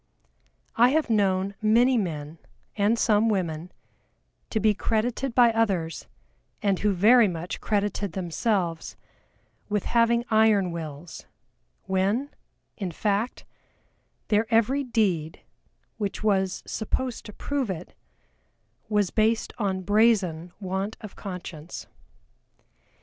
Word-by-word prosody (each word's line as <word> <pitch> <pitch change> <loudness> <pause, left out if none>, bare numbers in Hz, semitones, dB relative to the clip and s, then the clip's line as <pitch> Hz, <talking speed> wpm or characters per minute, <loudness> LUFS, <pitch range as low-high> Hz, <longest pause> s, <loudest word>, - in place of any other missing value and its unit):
I 240 +2 +6
have 295 -3 +1
known 195 -2 +1
many 235 +4 +4
men, 160 -7 -3 0.4
and 210 +2 +2
some 220 0 +3
women, 175 -4 -2 0.8
to 220 - 0
be 215 0 +3
credited 230 +5 -1
by 240 -2 +6
others, 195 -8 -1 0.6
and 195 -3 +2
who 210 - +2
very 220 +5 +6
much 175 -1 -5
credited 205 -3 -1
themselves, 175 -1 -1 0.7
with 210 -2 0
having 235 0 +2
iron 215 -4 +4
wills, 160 -1 -8 0.6
when, 195 +9 0 0.5
in 195 -3 -3
fact, 205 +6 -1 0.8
their 220 +2 +1
every 240 +5 +3
deed, 190 - 0 0.6
which 205 0 -3
was 190 -3 +1
supposed 250 +3 -3
to - - -8
prove 280 -2 -2
it, 180 -2 -6 1.0
was 205 -3 +1
based 220 +1 +1
on 190 -3 -1
brazen 190 -5 +2
want 190 +2 -3
of 215 - -9
conscience. 180 -4 -7
205 Hz, 110 wpm, -26 LUFS, 185-225 Hz, 1.0 s, I